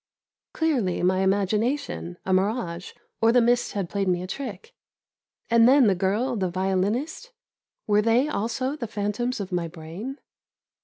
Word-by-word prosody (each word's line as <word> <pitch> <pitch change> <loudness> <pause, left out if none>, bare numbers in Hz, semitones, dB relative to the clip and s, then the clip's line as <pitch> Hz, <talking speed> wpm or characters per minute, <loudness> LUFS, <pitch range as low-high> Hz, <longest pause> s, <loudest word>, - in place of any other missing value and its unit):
Clearly 250 - 0
my 185 +1 +3
imagination, 195 - 0
a 190 - +1
mirage, 185 -3 -1 0.3
or 225 0 +5
the 245 - +5
mist 240 +1 +2
had 195 -3 -2
played 200 +2 -2
me 180 -1 +1
a - - -4
trick. 205 -1 -7 0.7
And 230 +1 +5
then 270 -1 +6
the 200 - +4
girl, 205 +8 0
the 190 -4 -1
violinist: 195 - -1 0.5
were 210 0 +3
they 230 +6 +3
also 255 +2 -2
the 240 -6 -5
phantoms 215 +4 -2
of 195 -1 -5
my 175 -2 -1
brain? 175 - -7
205 Hz, 150 wpm, -25 LUFS, 185-245 Hz, 0.7 s, then